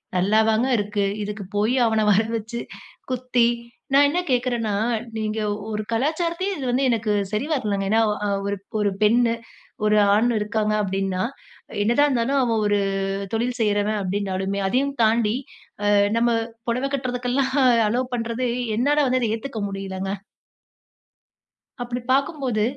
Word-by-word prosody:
நல்லாவாங்க 220 +5 +3
இருக்கு? 205 0 -1 0.2
இதுக்குப் 205 -2 -6
போயி 215 +5 +2
அவன 220 -1 +2
வரவச்சு 225 +2 0 0.5
குத்தி, 255 -1 +1 0.5
நான் 285 +1 +6
என்ன 340 +5 0
கேட்குறேன்னா, 240 -4 0 0.4
நீங்க 215 0 -2 0.3
ஒரு 215 0 -2
கலாச்சாரத்தையே 335 - 0
இது 270 - -4
வந்து 255 +3 +1
எனக்கு 225 -2 0 0.2
சரி 215 +5 -1
வரலைங்க. 205 -8 -1
ஏன்னா, 225 +1 +4 0.2
அ - - 0 0.2
ஒரு 200 0 -1 0.2
ஒரு 205 -1 +2
பெண்ணு, 230 +2 +4 0.5
ஒரு 210 0 +4 0.2
ஆண் 230 +3 +3
இருக்காங்க 215 0 0
அப்பிடின்னா, 195 -1 -1 0.6
என்னதான் 240 +7 +3
இருந்தாலும் 265 +1 +1
அவன் 230 -3 +1
ஒரு 205 0 +2 0.5
தொழில் 240 +2 -1
செய்றவன் 210 0 +1
அப்பிடினாலுமே 195 0 -2
அதையும் 275 +6 0
தாண்டி 220 0 +2 0.6
அ - - +4 0.3
நம்ம 240 +1 +3 0.4
புடவ 250 +4 0
கட்டுறதுக்கெல்லாம் 255 0 -1 0.3
அலோவ் 250 +3 -1
பண்றது 235 +1 -2 0.3
என்னால 285 +4 +3
வந்து 255 0 +2
அத 220 -2 +1
ஏத்துக்க 230 -1 -6
முடியலங்க. 195 0 -4 1.7
அப்பிடி 245 0 -3
பாக்கும்போது 270 -5 +1
225 Hz, 130 wpm, -23 LUFS, 210-255 Hz, 1.7 s, நான்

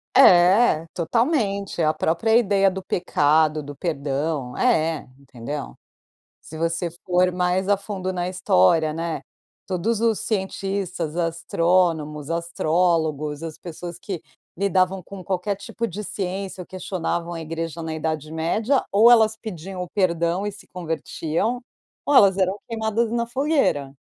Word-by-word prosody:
É, 180 - +6
totalmente. 200 - 0
A 155 -1 +3
própria 195 +10 +1
ideia 200 -4 +4
do 190 0 -6
pecado, 155 -3 +2
do 145 +1 -8
perdão 140 -3 -2
é, 165 - +1
entendeu. 140 +1 -7 0.6
Se 160 - -11
você 165 +1 -1
for 180 0 +2
mais 180 +1 0
a 205 - +4
fundo 190 -2 -4
na 180 -1 -2
história, 160 - +3
né, 165 +1 -3 0.5
todos 200 +4 -1
os 225 -2 +2
cientistas, 190 -5 -3
astrônomos, 165 -2 0
astrólogos, 160 -3 0
as 160 -2 -6
pessoas 175 0 -8
que 180 -2 -6 0.3
lidavam 190 0 +1
com 195 +2 -10
qualquer 195 +2 -1
tipo 230 +3 -4
de 200 +4 -6
ciência 190 -1 -4
ou - - -13
questionavam 175 -2 -3
a 165 - -5
igreja 165 +1 -5
na 160 0 -4
idade 155 -1 -3
média, 215 - +1
ou 220 +4 +7
elas 220 -2 +5
pediam 190 -4 -6
o 180 - -6
perdão 175 -1 0
e 205 - -3
se 210 - -14
convertiam, 170 +5 -2 0.5
ou 290 - +2
elas 195 -6 +6
eram 190 +1 +1
queimadas 225 0 0
na 235 0 0
fogueira. 260 - 0
180 Hz, 135 wpm, -23 LUFS, 160-200 Hz, 0.6 s, ou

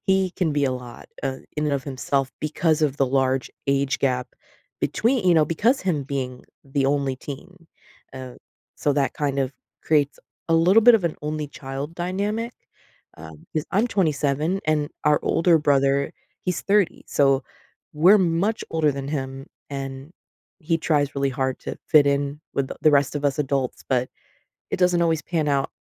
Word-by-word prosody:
he 190 -1 +2
can 165 -5 +1
be 145 -1 +1
a 130 - +1
lot, 125 -2 -9
uh, 135 -1 -2 0.2
in 150 -1 0
of 140 -1 -1
himself 135 0 -1
because 155 +1 +1
of 145 -2 +1
the 135 - +2
large 130 0 +1 0.2
age 140 0 +1
gap 125 -2 +1 0.5
between 235 -4 +1
you 175 - +6
know, 155 -1 +5
because 225 - +1
him 170 -7 0
being 130 -2 -4 0.2
the 135 0 -1
only 140 -2 +1
teen. 165 +6 -10 0.5
Uh, 130 -1 -8 0.4
so 145 - +1
that 135 -2 0
kind 140 -2 -1
of 135 0 0 0.3
creates 145 -2 +1 0.3
a 165 - +3
little 185 +7 +5
bit 240 0 +8
of 190 - -5
an 165 - 0
only 150 0 -3
child 140 +3 -6
dynamic, 205 +7 -2 0.6
um, 80 -1 -12
'cause 155 0 0
I'm 210 +6 +2
27, 155 - 0
and 150 -1 +1 0.2
our 150 0 +4
older 170 0 +3
brother, 140 -1 +2 0.3
he's 180 -1 -1
30, 200 -2 +1
so 135 -2 +2 0.5
we're 185 +7 +6
much 185 +5 +1
older 160 -2 +2
than 135 0 -5
him, 135 -2 -4 0.2
and 135 +2 -6 0.5
he 165 0 0
tries 145 -3 +1
really 140 0 0
hard 130 -1 -2
to - - -6
fit 145 -2 +6
in 140 +1 -1
with 135 -1 0
the - - -7
the 155 - +6
rest 140 0 +3
of 145 - -5
us 140 +1 +1
adults, 135 -3 -1
but 125 -1 +1 0.6
it - - 0
doesn't 180 -1 +3
always 160 -2 +1
pan 160 -3 -1
out 140 -1 +1
145 Hz, 175 wpm, -23 LUFS, 135-165 Hz, 0.6 s, bit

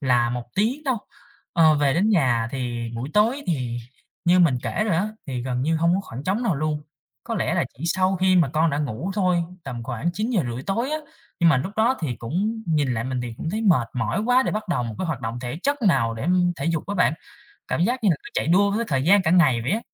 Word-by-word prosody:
là 120 -4 +2
1 120 -1 -3
tiếng 245 +10 0
đâu. 255 -4 0 0.5
Ờ, 160 -3 +5
về 145 -2 +2
đến 195 +6 +2
nhà 125 - +2
thì 120 -3 -4
buổi 120 +5 -5
tối, 235 +7 +3
thì 125 -8 -2 0.5
như 175 +1 +5
mình 150 -8 +4
kể 215 - -1
rồi 195 -7 +1
á, 205 +5 0 0.2
thì 125 -3 -3
gần 125 0 -2
như 160 +3 +1
hông 170 +2 +2
có 190 - +1
khoảng 135 -7 -9
trống 200 +6 0
nào 195 -8 +1
luôn, 150 +1 -2 0.4
có - - -3
lẽ - - 0
là - - +1
chỉ 165 - -6
sau 185 +2 +1
khi 185 0 +3
mà 165 -6 +4
con 160 +1 +2
đã 140 - -1
ngủ 145 - -3
thôi, 180 -4 +2 0.2
tầm 125 -3 -5
khoảng 120 +7 -2
9:30 175 - -1
tối 230 - -1
á. 310 - -1 0.4
Nhưng 170 - +6
mà 155 - +5
lúc 175 +10 -3
đó 235 +4 +3
thì 135 -8 -2
cũng 205 - -2
nhìn 145 -6 +1
lại 115 0 -2
mình 130 -1 -2
thì 120 -2 -5
cũng 160 - -4
thấy 215 +4 -2
mệt 170 - +3
mỏi 115 - -1
quá 250 +2 +4
để - - -2
bắt 215 -2 -4
đầu 125 -8 0
một 115 -2 -5
cái 185 - -2
hoạt 150 -6 -3
động 115 +1 -4
thể 125 +5 -5
chất 285 -1 0
nào 130 - +2
để 115 +8 -5 0.3
thể - - -4
dục 165 -2 -1
á 205 - -3
bạn, 180 -4 +3 0.6
cảm - - -1
giác 245 +2 -1
như 200 - +5
là 165 - +2
cứ 275 - -11
chạy - - 0
đua 200 +4 +4
với 225 +3 0
thời 135 -3 +1
gian 200 +4 +5
cả 160 - +1
ngày 135 -10 +4
vậy 125 - -2
á. 220 - 0
165 Hz, 260 wpm, -23 LUFS, 125-200 Hz, 0.6 s, Nhưng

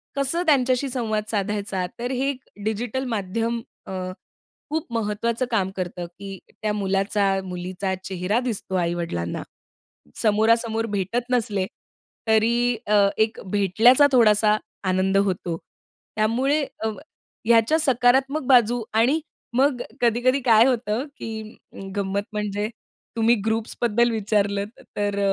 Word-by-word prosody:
कसं 280 +5 0
त्यांच्याशी 260 -3 +2
संवाद 220 -4 -1
साधायचा, 200 -2 -1
तर 245 +2 -2
हे 265 +1 0
एक 275 -2 -3 0.3
डिजिटल 230 +4 -2
माध्यम 225 +4 -2 0.3
अ, - - -6 0.8
खूप 315 +2 -2
महत्वाचं 230 +2 -1
काम 195 -5 +1
करतं, 180 -1 -4
की 195 +3 -9 0.2
त्या 215 -1 0
मुलाचा, 195 0 0 0.2
मुलीचा 185 +1 -4
चेहरा 190 +4 -1
दिसतो 230 -6 -3
आई 170 -2 +1
वडिलांना. 85 - -3 0.7
समोरासमोर 225 +1 +2
भेटत 230 +6 -2
नसले, 210 -6 +1 0.6
तरी 235 +2 +3
अ, 205 -1 +5
एक 220 +1 +1
भेटल्याचा 220 +8 +5
थोडासा 215 -3 +5 0.3
आनंद 190 +1 +2
होतो. 185 -4 0 0.6
त्यामुळे 255 +8 +1 0.2
अ, 220 - +1 0.6
ह्याच्या 230 +7 +4
सकारात्मक 270 +1 +2
बाजू 245 -2 +4
आणि 250 +8 +3 0.4
मग 265 -2 +3 0.2
कधी-कधी 245 +3 +3
काय 225 -1 +7
होतं, 240 -1 0
की 220 -1 -7 0.2
अ, - - -13 0.2
गंमत 200 0 -1
म्हणजे 210 0 -2 0.5
तुम्ही 230 +1 +4
ग्रुप्सबद्दल 225 +1 +1
विचारलत 205 -1 -1 0.2
तर, 205 -1 0
220 Hz, 120 wpm, -23 LUFS, 200-245 Hz, 0.8 s, काय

